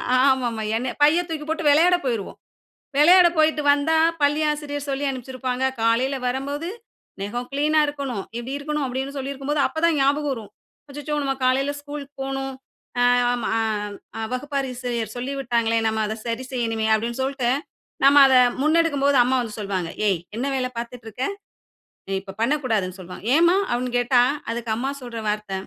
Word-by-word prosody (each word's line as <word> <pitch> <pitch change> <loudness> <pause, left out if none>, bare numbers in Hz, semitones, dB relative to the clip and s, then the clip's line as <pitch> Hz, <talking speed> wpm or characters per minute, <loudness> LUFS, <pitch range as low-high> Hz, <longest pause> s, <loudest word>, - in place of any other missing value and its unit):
ஆமாம் 255 -3 +2
ஐயா 220 +1 0
என்ன 255 0 -2
பைய 310 +4 +5
தூக்கி 305 -2 -4
போட்டு 320 0 -2
வெளையாட 340 +5 +5
போயிருவோ 230 -6 -2 0.6
வெளையாட 350 +4 +7
போய்ட்டு 310 -1 +3
வந்தா 305 +3 +2 0.2
பள்ளி 290 +2 +3
ஆசிரியர் 290 -1 -5
சொல்லி 275 +1 -1
அனுப்சிருப்பாங்க. 255 0 -4 0.2
காலையில 240 +4 +2
வரம்போது 285 +6 -3 0.5
நெகம் 240 +5 -4
கிளீன்னா 300 +2 +2
இருக்கணும். 275 -8 -4
இப்படி 255 +4 -4
இருக்கணும் 300 0 -2
அப்படின்னு 265 +3 -4
சொல்லியிருக்கும்போது 275 +2 -2
அப்ப 315 - -5
தான் 330 -3 +3
ஞாபகம் 285 +1 +2
வரும். 215 -4 -9 0.4
"அச்சச்சோ! 295 +1 -4
நாம 270 -1 -1
காலையில 270 +3 +2
ஸ்கூல் 290 -1 -7 0.2
போகனும். 270 0 -3 0.5
அ - - +5 0.3
ஆமா 240 -2 -2 0.8
வகுப்பாசிரியர் 250 -4 -3
சொல்லிவிட்டாங்களே 240 -3 0
நாம 220 0 0
அத 215 - -3
சரி 230 +3 -3
செய்யனுமே" 225 -3 -1
அப்படினு 235 +3 -3
சொல்லிட்டு 260 -2 0 0.5
நாம 280 +1 +8
அத 260 - +4 0.3
முன்னெடுக்கும்போது 290 -3 +3
அம்மா 260 +1 +1
வந்து 220 -2 -6
சொல்வாங்க. 190 -4 -2 0.2
ஏய் 175 -4 0
என்ன 250 +4 -2
வேல 255 -1 -1
பார்த்துட்டு 235 -1 -6
இருக்க? 250 +5 -3 0.8
நீ - - -3
இப்ப 195 -1 -9
பண்ணக்கூடாதுனு 225 -8 0
சொல்வாங்க. 180 +3 -10
"ஏம்மா" 345 +3 +5
அப்படினு 245 +1 -1
கேட்டா 245 0 +4 0.3
அதுக்கு 230 -1 -4
அம்மா 265 +4 -2
சொல்ற 235 -2 -6
வார்த்த 210 -1 -2
265 Hz, 150 wpm, -23 LUFS, 235-290 Hz, 0.8 s, நாம